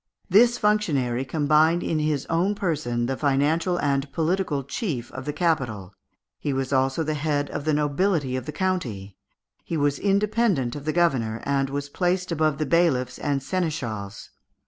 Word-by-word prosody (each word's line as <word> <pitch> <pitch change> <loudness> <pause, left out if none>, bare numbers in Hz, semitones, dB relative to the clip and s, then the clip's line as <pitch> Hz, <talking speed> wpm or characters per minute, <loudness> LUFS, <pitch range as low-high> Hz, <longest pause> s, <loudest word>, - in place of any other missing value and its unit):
This 240 +5 +6
functionary 145 - +1
combined 155 +4 +2
in 160 - 0
his 150 -3 0
own 180 +5 +1
person 150 - -1
the 135 +2 -1
financial 150 +6 +1
and 140 0 0
political 165 -3 0
chief 140 - -4
of 130 0 -7
the 150 - -1
capital, 125 - -1 0.5
he 145 - -2
was 135 +1 -2
also 135 +4 +1
the 155 0 -1
head 145 -1 -1
of 145 - -4
the 155 - +2
nobility 150 -1 +1
of 130 -1 -4
the - - -3
county, 125 - -2 0.5
he 165 - -3
was 145 -1 +1
independent 200 - +1
of 145 -1 -7
the 155 - +1
governor, 130 -10 +1
and 135 -1 +1
was 145 +1 -3
placed 180 +4 -1
above 155 -3 +1
the 155 - -1
bailiffs 135 -5 +1
and 140 -2 -1
seneschals. 130 - -3
150 Hz, 165 wpm, -24 LUFS, 135-170 Hz, 0.5 s, This